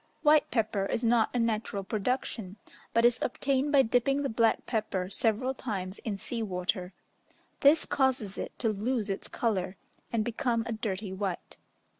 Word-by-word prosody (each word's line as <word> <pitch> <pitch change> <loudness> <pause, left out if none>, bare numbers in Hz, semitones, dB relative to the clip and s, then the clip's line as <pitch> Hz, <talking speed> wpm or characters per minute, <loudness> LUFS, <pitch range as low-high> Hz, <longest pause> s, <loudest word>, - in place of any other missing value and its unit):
White 300 0 +5
pepper 215 -4 0
is 230 - -1
not 230 -1 +4
a - - -2
natural 220 -3 -1
production, 210 -1 -2 0.4
but 230 +1 +3
is 240 -1 +4
obtained 275 +2 0
by 280 -2 +6
dipping 255 +4 +2
the 275 - 0
black 225 0 +2
pepper 200 -5 -2
several 230 +5 +1
times 195 -7 -4
in 210 -3 -3
sea 230 +3 -4
water: 180 -2 -2 0.7
this 295 +3 +5
causes 260 -8 0
it - - -4
to 230 - +1
lose 215 0 -1
its 195 - -4
colour, 190 -5 -1 0.3
and 220 -2 0
become 235 0 0
a 235 - -4
dirty 205 -3 -3
white. 190 -2 -4
225 Hz, 160 wpm, -29 LUFS, 200-250 Hz, 0.7 s, by